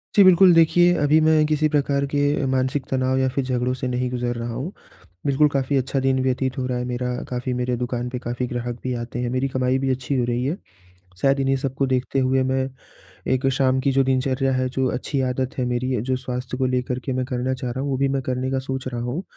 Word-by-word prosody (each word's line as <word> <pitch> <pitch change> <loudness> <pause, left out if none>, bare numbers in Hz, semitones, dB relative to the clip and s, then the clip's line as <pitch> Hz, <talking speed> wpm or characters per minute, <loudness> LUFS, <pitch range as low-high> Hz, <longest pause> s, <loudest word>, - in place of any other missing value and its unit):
जी, 200 - +8
बिल्कुल, 185 0 +7
देखिए 175 +2 +5
अभी 150 +2 +5
मैं 155 -1 +4
किसी 155 0 +2
प्रकार 140 -1 +1
के 145 0 +1
मानसिक 130 +1 0
तनाव 130 0 +1
या 130 - +2
फिर 135 +1 -1
झगड़ों 125 0 0
से 130 0 -3
नहीं 125 0 -1
गुजर 120 -1 -2
रहा 115 0 -4
हूँ। 135 +10 -4 0.6
बिल्कुल 145 +2 +4
काफ़ी 140 0 0
अच्छा 135 +1 0
दिन 130 0 +1
व्यतीत 130 0 -1
हो 130 - -1
रहा 125 -1 -1
है 125 - -2
मेरा, 125 0 -3 0.2
काफ़ी 125 +1 -2
मेरे 125 0 -1
दुकान 125 0 -3
पे 125 - -4
काफ़ी 120 +1 -3
ग्राहक 120 0 -4
भी 130 -1 -1
आते 120 0 -5
हैं, 120 -1 -1
मेरी 130 +2 0
कमाई 130 0 0
भी 135 0 -1
अच्छी 130 +1 -1
हो 120 - +2
रही 120 +1 -1
है। 150 +7 -1 0.7
शायद 140 0 +3
इन्हीं 135 0 +2
सब 135 0 -3
को 135 0 +1
देखते 130 +1 0
हुए 130 0 +2
मैं 130 0 0 0.6
एक 130 +1 +1
शाम 130 0 +2
की 140 - +1
जो 135 - +4
दिनचर्या 130 0 +1
है 130 0 0
जो 130 0 -1
अच्छी 135 +2 -2
आदत 130 0 -1
है 130 - +1
मेरी 125 0 -1
जो 130 +1 0
स्वास्थ्य 125 0 -5
को 130 - +2
लेकर 125 0 -1
के 130 - -2
मैं 130 0 -1
करना 130 +1 -2
चाह 125 -1 -4
रहा 130 +2 -4
हूँ 140 - -2
वो 135 - 0
भी 135 +1 +1
मैं 135 0 -1
करने 130 0 -2
का 135 - 0
सोच 130 0 -4
रहा 120 -2 -4
हूँ, 125 +9 -3
130 Hz, 245 wpm, -23 LUFS, 125-135 Hz, 0.7 s, जी